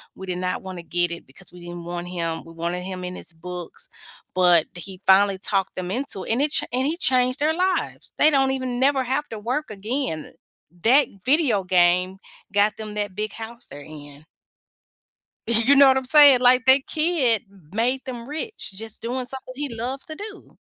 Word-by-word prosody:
We 190 - -9
did 180 -1 -3
not 180 0 -2
wanna 185 -3 -8
get 175 0 0
it 170 - -7
because 160 +8 -13
we 180 - -12
didn't 175 0 -8
want 175 0 -5
him 165 -2 -4
we 165 - -13
wanted 170 +2 -3
him 185 -1 -6
in 180 0 -5
his 165 -2 -5
books." 180 +1 -8 0.5
But 175 -3 +5
he 185 +2 -9
finally 195 0 +5
talked 195 -1 -1
them 180 0 -4
into 235 -5 -3
it - - -4
and 250 - +1
it 295 0 +1
ch - - +2
and 255 +2 0
he 325 +3 -2
changed 255 -4 +2
their 305 +2 +2
lives. 370 +2 -2
They 305 - +6
don't 270 -3 +2
even 255 -2 -3
never 270 0 +3
have 265 +4 -1
to 220 - -6
work 250 +7 -3
again. 215 - -4 0.5
That 265 +4 +5 0.2
video 260 - +2
game 180 +1 +2 0.4
got 205 +1 +3
them 215 -1 -7
that 205 -2 -3
big 215 0 -3
house 235 +2 -9
they're 145 - -9
in. 145 -1 -12 1.2
Y 235 - +2
You 280 +2 +6
know 275 0 +8
what 265 0 +5
I'm 265 - -2
saying? 285 -1 +7
Like 250 0 +5
their 265 +1 +7
kid 305 - +1 0.3
made 250 +4 0
them 240 -2 -7
rich 320 - -5
just 220 +1 -7
doing 250 +2 -3
something 260 0 -7
he 290 +2 -3
loves 250 +4 -4
to 315 - -7
do. 410 +3 -10
225 Hz, 200 wpm, -23 LUFS, 180-265 Hz, 1.2 s, know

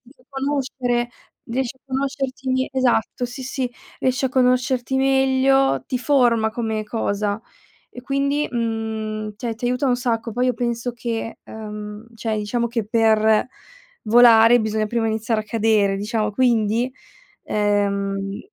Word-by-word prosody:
fa - - -26
conoscere, 270 -3 -1 0.4
riesci 250 +1 -2
a - - -55
conoscerti 265 -1 -2
esatto, 250 -2 +1
sì 245 +2 -8
sì, 255 -1 -3 0.3
riesci 260 +1 +1
a - - 0
conoscerti 255 0 +1
meglio, 270 0 +3
ti 255 - -1
forma 240 -5 +2
come 220 -2 -2
cosa 210 -1 -2 0.5
e 250 - -9
quindi 280 +3 0
mhmm, 220 -2 -3
ti 245 - -8
a 230 - -1
ti 240 - -5
aiuta 250 +3 0
un 250 - +3
sacco. 235 -2 -1
Poi 250 +2 +1
io 250 - +2
penso 235 0 -2
che 230 -1 -4
ehm, 210 0 -8
cioè, 225 -1 -2
diciamo 235 +3 -1
che 230 -3 -2
per 220 0 +3 0.6
volare 230 +1 +7
bisogna 215 0 -1
prima 230 0 0
iniziare 220 0 0
a - - -13
cadere, 215 -3 +2
diciamo, 210 +1 -1
quindi, 235 +1 +1 0.5
ehm 200 -1 0
235 Hz, 140 wpm, -22 LUFS, 220-255 Hz, 0.6 s, volare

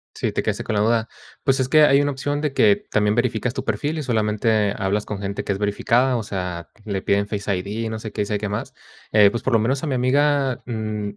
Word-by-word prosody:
Sí, - - -1
te - - -1
quedaste - - -2
con 110 - -2
la 105 - +2
duda. 115 +1 +2 0.4
Pues 135 -1 +2
es 130 0 0
que 155 -1 +6
hay 140 -1 +5
una 145 0 0
opción 145 +2 -2
de 150 -3 -1
que 205 +7 +5 0.2
también 105 0 +2
verificas 120 0 0
tu - - -4
perfil 145 +9 -2
y - - -3
solamente 110 -3 +1
hablas 100 +2 -1
con 100 -1 -5
gente 100 0 -3
que - - -2
es 95 - -6
verificada, 120 +5 +2
o 110 - -3
sea, 90 -4 -5 0.2
le 100 -2 -2
piden 100 +1 +1
Face 105 -1 -2
ID, 105 +5 -3
no 110 0 -4
sé 110 -2 -7
qué, 105 - -1
y - - -4
sabe 105 0 -2
qué 105 -1 -3
más. 105 - -4 0.4
Eh, 105 -2 +6
pues, 115 +3 -4
por 130 - 0
lo 115 - +5
menos 130 +7 0
a - - -1
mi 135 - 0
amiga, 135 0 +2
mm, 110 -3 -3
110 Hz, 260 wpm, -22 LUFS, 105-130 Hz, 0.4 s, que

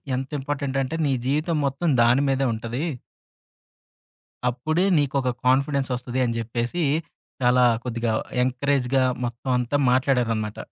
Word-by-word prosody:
ఎంతింపార్టెంటంటే 135 +1 -2
నీ 140 - +2
జీవితం 155 +4 0
మొత్తం 140 +6 -1
దాని 125 +4 +4
మీదే 135 0 +1
ఉంటది." 115 +6 -4 1.7
"అప్పుడే 155 +9 0
నీకొక 135 -3 +1
కాన్‌ఫిడెన్సొస్తది" 130 -2 +1
అని 115 -1 -1
జెప్పేసి, 120 +8 -2 0.6
చాలా 125 0 +4 0.2
కొద్దిగా 115 -2 -1 0.3
ఎంకరేజ్‌గా 130 0 +1 0.2
మొత్తమంతా 125 +2 -1
మాట్లాడారనమాట. 120 -5 +1
130 Hz, 95 wpm, -24 LUFS, 120-140 Hz, 1.7 s, దాని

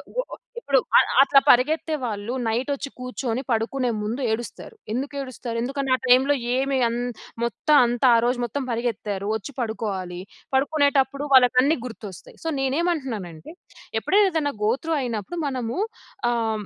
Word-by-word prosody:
Go - - +2
ఆహ్, - - -9 0.2
ఇప్పుడు 280 - +2 0.2
అ - - +10 0.2
అట్లా 275 0 +6
పరిగెత్తే 310 +5 +3
వాళ్ళు 220 0 -3
నైట్ 235 +5 -1
వచ్చి 280 0 -5
కూర్చొని 250 -1 -3
పడుకునే 240 +3 0
ముందు 225 +6 -3
ఏడుస్తారు. 240 - -5 0.2
ఎందుకేడుస్తారు? 260 -2 -4
ఎందుకంటే 270 +2 -2
ఆ - - -3
టైమ్‌లో 260 +3 +5 0.2
ఏమి 270 +1 0
అంద్ 245 +1 -2 0.3
మొత్తం 265 +6 +1
అంతా 245 +2 +2
ఆ - - +4
రోజు 245 +1 0
మొత్తం 270 +4 -3
పరిగెత్తారు. 220 -4 -2
వచ్చి 220 +6 -6
పడుకోవాలి. 195 -6 -4 0.3
పడుకునేటప్పుడు 280 0 +2
వాళ్ళకన్ని 255 +4 +5
గుర్తొస్తాయి. 215 -6 -10
సో, - - 0
నేనేమంటున్నానంటే, 265 - -2 0.5
ఎప్పుడైనా 400 0 +3
ఏదైనా 295 -3 0
గో 215 - +3
త్రూ 325 0 -1
అయినప్పుడు 240 - -4
మనము 250 -2 -3 0.5
ఆహ్, 225 -2 -1
హ్మ్. - - -12
255 Hz, 145 wpm, -24 LUFS, 225-280 Hz, 0.5 s, అ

